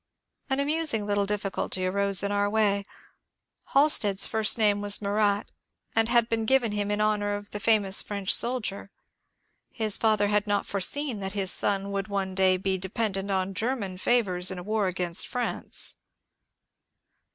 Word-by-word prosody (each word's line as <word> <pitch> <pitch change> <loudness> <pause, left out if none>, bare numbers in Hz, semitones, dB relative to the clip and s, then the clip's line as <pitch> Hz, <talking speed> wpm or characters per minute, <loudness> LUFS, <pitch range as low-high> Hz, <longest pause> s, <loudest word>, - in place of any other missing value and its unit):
An 265 +1 0
amusing 290 -7 -1
little 205 -1 -1
difficulty 195 -2 -3
arose 200 0 +2
in 200 - -1
our 205 0 0
way. 205 -2 +1 0.9
Halstead^s 235 -9 +3
first 220 0 +3
name 205 -2 +2
was 205 -1 0
Murat, 205 0 0 0.4
and 225 0 +2
had 235 -1 +3
been 225 -1 -2
given 245 -2 +2
him 205 -1 -2
in 205 0 0
honour 210 -1 0
of 205 0 -9
the 210 - -4
famous 205 -3 +3
French 200 -2 -1
soldier. 225 -5 0 0.8
His 215 -3 +1
father 215 -2 +2
had 210 0 0
not 205 -1 0
foreseen 235 +5 -1
that 195 0 -4
his 195 -2 0
son 200 0 -1
would 195 -1 -3
one 195 -2 -3
day 185 -1 +2
be 190 0 -2
dependent 195 +1 -3
on 190 0 -1
German 205 -4 -3
favours 185 -6 +1
in 190 - -4
a 180 - -7
war 215 0 -1
against 180 -2 +2
France. 245 -1 -1
205 Hz, 160 wpm, -26 LUFS, 195-220 Hz, 0.9 s, Halstead^s